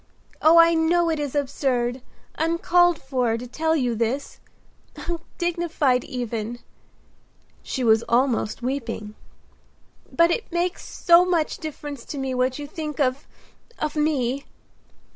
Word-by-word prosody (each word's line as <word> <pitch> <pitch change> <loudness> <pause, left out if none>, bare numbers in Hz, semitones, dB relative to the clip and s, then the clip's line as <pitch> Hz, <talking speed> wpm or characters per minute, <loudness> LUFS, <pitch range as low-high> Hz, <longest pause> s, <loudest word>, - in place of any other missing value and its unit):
Oh, 320 +2 +6
I 335 0 +7
know 335 +1 +2
it 315 - -1
is 290 -1 -3
absurd, 260 -3 -1 0.3
uncalled 340 +1 +2
for, 250 -4 0
to 240 - -7
tell 320 +6 0
you 250 -6 0
this; 235 +5 -2 0.6
undignified 335 -5 -1
even," 235 -2 -4 1.0
she 260 - -4
was 225 -1 +5
almost 240 -2 +1
weeping, 230 -5 -3 1.0
"but 335 0 +4
it 440 0 -2
makes 350 +2 -1
so 340 +1 +5
much 345 -4 0
difference 290 -4 -7
to 290 - -6
me 265 -1 -2
what 255 0 0
you 295 - -6
think 305 -1 -6
of—of 290 - -4
me." 280 -3 0
285 Hz, 125 wpm, -24 LUFS, 250-330 Hz, 1.0 s, I